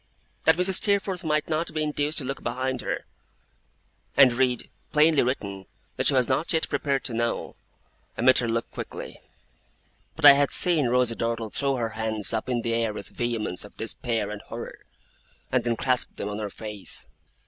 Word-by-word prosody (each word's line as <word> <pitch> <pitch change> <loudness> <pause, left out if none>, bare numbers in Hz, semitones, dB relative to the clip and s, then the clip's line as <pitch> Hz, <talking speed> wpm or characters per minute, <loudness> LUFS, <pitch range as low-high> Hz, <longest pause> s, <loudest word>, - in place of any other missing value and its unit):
That - - +6
Mrs. 185 +1 +4
Steerforth 200 -2 +1
might 150 -1 0
not 160 +1 -1
be 155 - 0
induced 150 0 -1
to - - +2
look 135 +1 -4
behind 130 +2 -2
her, - - -3 1.1
and 135 -3 +7
read, 125 0 0 0.2
plainly 155 0 +5
written, 100 -7 -3 0.3
what - - +1
she - - +5
was 125 -2 +3
not 135 +5 0
yet 160 - +1
prepared 140 -2 0
to 120 - -1
know, 115 +1 -2 0.6
I - - -2
met 130 - +6
her 120 - -1
look 115 0 -2
quickly; - - -8 0.9
but - - 0
I 145 - +13
had 140 0 +2
seen 165 -7 +3
Rosa 125 -1 +2
Dartle 115 -2 -2
throw 140 -1 0
her 115 -3 -1
hands 110 -1 -2
up 110 +3 -2
in 120 -2 0
the 115 - -1
air 115 -2 0
with 100 -1 -7
vehemence 115 -6 -2
of 105 - -14
despair 115 0 -2
and 105 -1 -6
horror, - - -8 0.7
and - - +2
then 120 -1 0
clasp 125 +1 -1
them 100 - -4
on 105 +1 -4
her 105 -1 -3
face. 105 -1 -5
125 Hz, 185 wpm, -26 LUFS, 115-145 Hz, 1.1 s, I